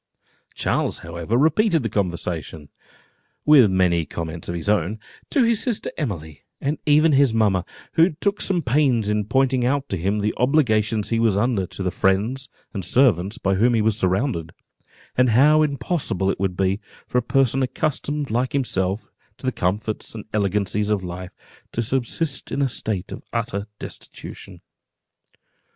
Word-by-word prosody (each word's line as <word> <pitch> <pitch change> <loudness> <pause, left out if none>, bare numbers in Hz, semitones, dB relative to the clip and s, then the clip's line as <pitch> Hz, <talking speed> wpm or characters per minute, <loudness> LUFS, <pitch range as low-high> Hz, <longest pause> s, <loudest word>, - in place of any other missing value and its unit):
Charles, - - 0
however, 85 +7 -2
repeated 160 - +3
the - - 0
conversation 85 -6 -3 0.8
(with 140 -8 +7
many 90 -3 +2
comments 80 +2 -5
of 85 - -2
his 85 - -5
own) 105 +1 +1 0.3
to 275 - +3
his 230 -2 +3
sister 240 -5 -1
Emily, 80 - -5 0.2
and 145 +2 -2
even 155 +2 +5
his 135 -4 +4
mamma, 100 -5 +2 0.3
who 165 +3 +5
took 200 +6 -2
some 180 -4 +1
pains 125 -5 +2
in 105 -1 0
pointing 130 +2 +2
out 140 +2 0
to 95 - -1
him 100 +5 0
the 105 +1 0
obligations 110 -6 +2
he 115 - +1
was 110 -4 +2
under 105 -4 +1
to 95 - -6
the 90 - 0
friends 110 +10 0 0.2
and 100 -4 -4
servants 105 -3 +3
by 95 - 0
whom 115 +5 +3
he 110 - +2
was 110 -1 +2
surrounded, 95 - -1 0.6
and 125 0 +4
how 145 +7 +5
impossible 140 - 0
it - - -5
would 95 -2 -1
be, 95 +1 +1 0.3
for 125 - +1
a - - -1
person 135 +1 +2
accustomed 145 +1 -2
like 125 +3 0
himself 100 -7 -1 0.3
to - - -10
the 130 - +2
comforts 105 +3 -2
and 110 - -7
elegancies 105 0 0
of 105 -3 0
life, 90 +1 -6 0.4
to 115 - -1
subsist 135 +4 -2
in 140 - 0
a - - +3
state 105 -6 -3
of - - -7
utter 110 -3 -2
destitution. - - -10
110 Hz, 165 wpm, -22 LUFS, 95-135 Hz, 0.8 s, with